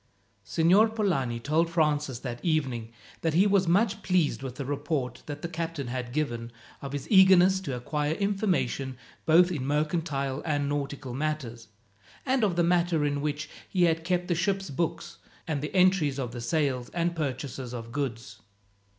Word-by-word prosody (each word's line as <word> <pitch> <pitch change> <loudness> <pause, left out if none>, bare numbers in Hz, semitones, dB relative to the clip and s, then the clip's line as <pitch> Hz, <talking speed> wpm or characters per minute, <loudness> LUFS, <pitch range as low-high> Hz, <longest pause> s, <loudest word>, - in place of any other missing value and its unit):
Signor 180 - +4
Polani 170 - 0
told 155 +7 +1
Francis, 150 -5 +1
that 120 -2 -6
evening, 130 -9 -1 0.3
that 160 -2 0
he 185 +4 +5
was 200 -3 +3
much 200 +4 +2
pleased 180 -8 +1
with 130 -2 -6
the 140 - -5
report 140 -2 -2
that 145 -1 -6
the - - -1
captain 165 -3 -4
had 125 -1 -4
given 120 -5 -2 0.3
of 140 - -6
his 145 - -4
eagerness 190 -1 +7
to 140 -9 -4
acquire 150 +5 -1
information 185 - -1 0.3
both 175 +3 +6
in 150 -7 -2
mercantile 145 -1 -1
and 145 -3 0
nautical 140 -2 -3
matters, 130 -5 -3 0.6
and 260 -2 +2
of 195 -5 +2
the 175 - +3
manner 170 -3 +2
in 145 -1 -1
which 150 0 -2 0.2
he 185 -2 +2
had 165 -1 +2
kept 180 +1 0
the 175 - +1
ship's 190 0 -1
books, 165 +4 -3 0.3
and 150 -4 -1
the 150 +6 -5
entries 180 -7 +3
of 125 -4 -3
the 120 -1 -6
sales, 130 -1 0
and 170 0 0
purchases 135 -4 -4
of 115 -2 -7
goods. 130 -3 -4
150 Hz, 170 wpm, -28 LUFS, 135-175 Hz, 0.6 s, eagerness